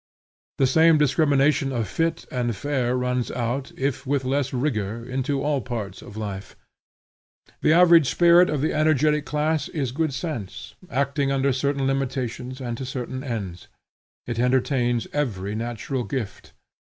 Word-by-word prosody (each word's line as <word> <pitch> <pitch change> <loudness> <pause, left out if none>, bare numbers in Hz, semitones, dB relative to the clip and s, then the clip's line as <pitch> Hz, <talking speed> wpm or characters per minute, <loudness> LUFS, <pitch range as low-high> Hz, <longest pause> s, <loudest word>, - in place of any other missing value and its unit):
The 135 - +3
same 160 +4 +5
discrimination 145 -1 +2
of 115 -5 -1
fit 165 0 -1
and 120 -3 -1
fair 125 +1 -1
runs 125 -1 -1
out, 125 +3 -3
if 135 0 -2
with 140 -1 0
less 135 +1 0
rigor, 115 -4 -2
into 135 +2 -1
all 145 -2 0
parts 110 -6 -5
of 105 - -11
life. 100 -3 -6 1.1
The 155 - +4
average 170 -4 +6
spirit 175 +1 +5
of 150 -3 -1
the 155 - 0
energetic 150 -1 +2
class 150 +1 0
is 140 -8 -2
good 155 +3 -1
sense, 125 - -5 0.2
acting 140 +1 0
under 135 0 +2
certain 140 +1 0
limitations 130 -1 -2
and 120 -3 -4
to - - -4
certain 130 0 -5
ends. 100 -9 -5 0.6
It 120 -1 -4
entertains 125 -1 +1
every 105 -9 -2
natural 120 +3 -3
gift. 120 -7 -5
135 Hz, 145 wpm, -24 LUFS, 120-145 Hz, 1.1 s, average